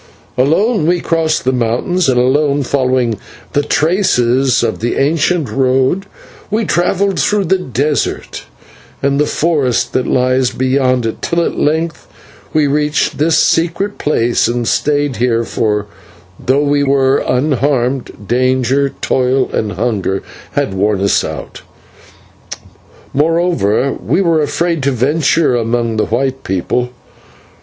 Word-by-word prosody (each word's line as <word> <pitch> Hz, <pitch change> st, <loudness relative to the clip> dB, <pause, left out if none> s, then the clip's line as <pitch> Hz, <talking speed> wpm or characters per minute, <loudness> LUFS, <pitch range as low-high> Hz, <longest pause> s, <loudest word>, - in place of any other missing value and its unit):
"Alone 165 Hz, -, +2 dB
we 175 Hz, +1 st, +2 dB
crossed 165 Hz, -2 st, 0 dB
the 130 Hz, -, +3 dB
mountains, 125 Hz, +8 st, 0 dB
and 125 Hz, -1 st, +2 dB
alone, 140 Hz, +3 st, +2 dB
following 130 Hz, -4 st, 0 dB, 0.3 s
the 145 Hz, -, +2 dB
traces 135 Hz, -6 st, +1 dB
of 115 Hz, -, -1 dB
the 120 Hz, +2 st, -1 dB
ancient 155 Hz, +2 st, +1 dB
road, 135 Hz, +8 st, +1 dB, 0.4 s
we 215 Hz, +2 st, 0 dB
travelled 195 Hz, +2 st, 0 dB
through 210 Hz, -1 st, +1 dB
the 190 Hz, +2 st, +1 dB
desert 145 Hz, -1 st, -2 dB, 0.6 s
and 140 Hz, 0 st, +1 dB
the 150 Hz, -, +2 dB
forest 145 Hz, -7 st, 0 dB
that 130 Hz, -, 0 dB
lies 130 Hz, 0 st, +2 dB
beyond 130 Hz, -1 st, 0 dB
it, 115 Hz, -, -4 dB
till 170 Hz, 0 st, 0 dB
at -, -, -3 dB
length 160 Hz, +2 st, -1 dB, 0.4 s
we 155 Hz, -1 st, +2 dB
reached 150 Hz, +2 st, 0 dB
this 160 Hz, +1 st, +3 dB
secret 170 Hz, +7 st, +1 dB
place 120 Hz, -7 st, +1 dB
and 120 Hz, 0 st, -2 dB
stayed 145 Hz, -3 st, 0 dB
here, 115 Hz, 0 st, +1 dB
for, 105 Hz, -2 st, -1 dB, 0.6 s
though 135 Hz, +3 st, +2 dB
we 145 Hz, 0 st, +1 dB
were 135 Hz, -1 st, +2 dB
unharmed, 130 Hz, -4 st, -1 dB
danger, 130 Hz, +2 st, +1 dB
toil, 130 Hz, 0 st, +1 dB
and 105 Hz, -2 st, -1 dB
hunger 105 Hz, -5 st, -2 dB, 0.3 s
had -, -, -1 dB
worn 100 Hz, +1 st, 0 dB
us 100 Hz, -1 st, +2 dB
out, -, -, -7 dB, 1.5 s
moreover 155 Hz, -, +1 dB
we -, -, +1 dB
were 165 Hz, -4 st, +2 dB
afraid 165 Hz, +1 st, -1 dB
to 135 Hz, -, +1 dB
venture 145 Hz, +3 st, +1 dB
among 115 Hz, -1 st, -1 dB
the 110 Hz, -, 0 dB
white 135 Hz, +3 st, -1 dB
people. 95 Hz, +7 st, -1 dB
135 Hz, 130 wpm, -15 LUFS, 125-155 Hz, 1.5 s, the